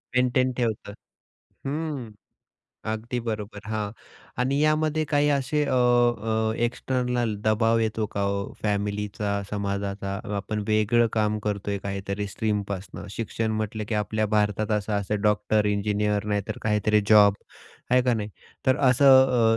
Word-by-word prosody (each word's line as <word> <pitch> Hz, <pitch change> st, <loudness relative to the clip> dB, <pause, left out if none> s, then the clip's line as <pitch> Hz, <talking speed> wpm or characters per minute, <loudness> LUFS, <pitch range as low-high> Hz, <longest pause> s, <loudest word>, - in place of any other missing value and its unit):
Maintain 125 Hz, +1 st, +2 dB
ठेवतं. 115 Hz, -4 st, -2 dB, 0.7 s
हं, 145 Hz, -5 st, -3 dB, 0.8 s
अगदी 115 Hz, +3 st, -3 dB
बरोबर, 105 Hz, -1 st, -4 dB
हां 105 Hz, -2 st, -2 dB, 0.5 s
आणि 135 Hz, +2 st, +1 dB
यामध्ये 155 Hz, 0 st, +2 dB
काही 145 Hz, 0 st, +2 dB
असे 145 Hz, +1 st, +1 dB
अ, 140 Hz, -, -2 dB
अ, 120 Hz, -3 st, +2 dB
एक्सटर्नल 125 Hz, -2 st, -1 dB
दबाव 115 Hz, +1 st, +3 dB
येतो 110 Hz, -1 st, 0 dB
का 100 Hz, -, -1 dB
हो 100 Hz, 0 st, -2 dB
फॅमिलीचा, 105 Hz, 0 st, -1 dB, 0.2 s
समाजाचा. 100 Hz, -1 st, -3 dB, 0.2 s
आपण 105 Hz, +1 st, -3 dB
वेगळं 110 Hz, +2 st, +3 dB
काम 105 Hz, -1 st, +1 dB
करतोय 100 Hz, -1 st, -2 dB
काहीतरी 100 Hz, +1 st, -3 dB
स्ट्रीमपासनं. 100 Hz, -2 st, -3 dB
शिक्षण 110 Hz, 0 st, -2 dB
म्हटलं 110 Hz, 0 st, -3 dB
की 110 Hz, -, -1 dB
आपल्या 110 Hz, +1 st, 0 dB
भारतात 105 Hz, 0 st, +1 dB
असं-असं 105 Hz, 0 st, -2 dB
डॉक्टर, 105 Hz, 0 st, +2 dB
इंजिनिअर 105 Hz, 0 st, 0 dB
नाहीतर 105 Hz, +1 st, -2 dB
काहीतरी 105 Hz, 0 st, +2 dB
जॉब 105 Hz, -2 st, +7 dB, 0.6 s
आहे 125 Hz, 0 st, +5 dB
का 125 Hz, -1 st, +2 dB
नाही, 105 Hz, -2 st, -3 dB, 0.4 s
तर 130 Hz, +2 st, +3 dB
असं 130 Hz, -3 st, +5 dB
110 Hz, 125 wpm, -25 LUFS, 105-120 Hz, 0.8 s, जॉब